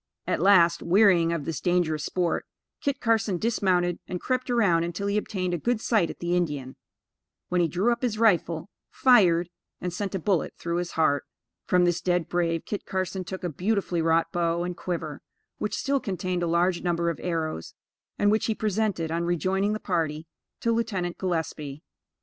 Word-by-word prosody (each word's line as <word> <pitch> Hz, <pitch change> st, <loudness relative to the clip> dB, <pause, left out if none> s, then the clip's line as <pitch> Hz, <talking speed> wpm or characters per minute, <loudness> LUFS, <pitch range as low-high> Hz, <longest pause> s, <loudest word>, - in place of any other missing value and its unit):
At -, -, -1 dB
last, 175 Hz, -3 st, +5 dB
wearying 180 Hz, -3 st, +4 dB
of 165 Hz, -4 st, -2 dB
this 165 Hz, -, -3 dB
dangerous 175 Hz, -4 st, +1 dB
sport, 175 Hz, 0 st, -1 dB, 0.3 s
Kit 280 Hz, -1 st, -1 dB
Carson 225 Hz, -5 st, +1 dB
dismounted, 180 Hz, -5 st, +1 dB
and 180 Hz, -, -4 dB
crept 255 Hz, +3 st, -2 dB
around 200 Hz, -9 st, +3 dB
until 175 Hz, +4 st, -3 dB
he 200 Hz, 0 st, 0 dB
obtained 185 Hz, -4 st, -1 dB
a 175 Hz, -, -1 dB
good 240 Hz, +5 st, 0 dB
sight 220 Hz, -7 st, +2 dB
at -, -, -7 dB
the 175 Hz, +1 st, -1 dB
Indian; 145 Hz, -7 st, -2 dB, 0.7 s
when, 180 Hz, 0 st, +2 dB
he 170 Hz, -, +3 dB
drew 190 Hz, +8 st, +1 dB
up 235 Hz, -, -1 dB
his 235 Hz, -4 st, -1 dB
rifle, 180 Hz, -5 st, +2 dB, 0.2 s
fired, 180 Hz, -10 st, +4 dB, 0.3 s
and 180 Hz, -1 st, -4 dB
sent 195 Hz, +1 st, -3 dB
a -, -, -1 dB
bullet 180 Hz, -1 st, 0 dB
through 170 Hz, 0 st, -2 dB
his 175 Hz, 0 st, -3 dB
heart. 145 Hz, -3 st, +2 dB, 0.4 s
From 180 Hz, -1 st, +4 dB
this 175 Hz, 0 st, +1 dB
dead 175 Hz, -2 st, +1 dB
brave, 170 Hz, -2 st, 0 dB
Kit 205 Hz, -, -4 dB
Carson 185 Hz, 0 st, -3 dB
took 190 Hz, +1 st, -7 dB
a 175 Hz, -, -1 dB
beautifully 180 Hz, +1 st, -1 dB
wrought 165 Hz, 0 st, +2 dB
bow 170 Hz, 0 st, 0 dB
and 180 Hz, 0 st, -3 dB
quiver, 165 Hz, -5 st, -4 dB, 0.4 s
which 210 Hz, -, -2 dB
still 275 Hz, 0 st, +1 dB
contained 185 Hz, -4 st, -2 dB
a 175 Hz, -, 0 dB
large 170 Hz, +1 st, +2 dB
number 170 Hz, -1 st, 0 dB
of -, -, -8 dB
arrows, 160 Hz, -, -3 dB, 0.4 s
and 205 Hz, 0 st, +3 dB
which 215 Hz, -, +1 dB
he 220 Hz, -, 0 dB
presented, 210 Hz, -6 st, -1 dB
on 170 Hz, +1 st, -1 dB
rejoining 190 Hz, +4 st, 0 dB
the 215 Hz, -, -3 dB
party, 160 Hz, -5 st, -1 dB, 0.4 s
to 230 Hz, -, +1 dB
Lieutenant 205 Hz, -7 st, -1 dB
Gillespie. 160 Hz, -5 st, -3 dB
180 Hz, 185 wpm, -26 LUFS, 170-205 Hz, 0.7 s, last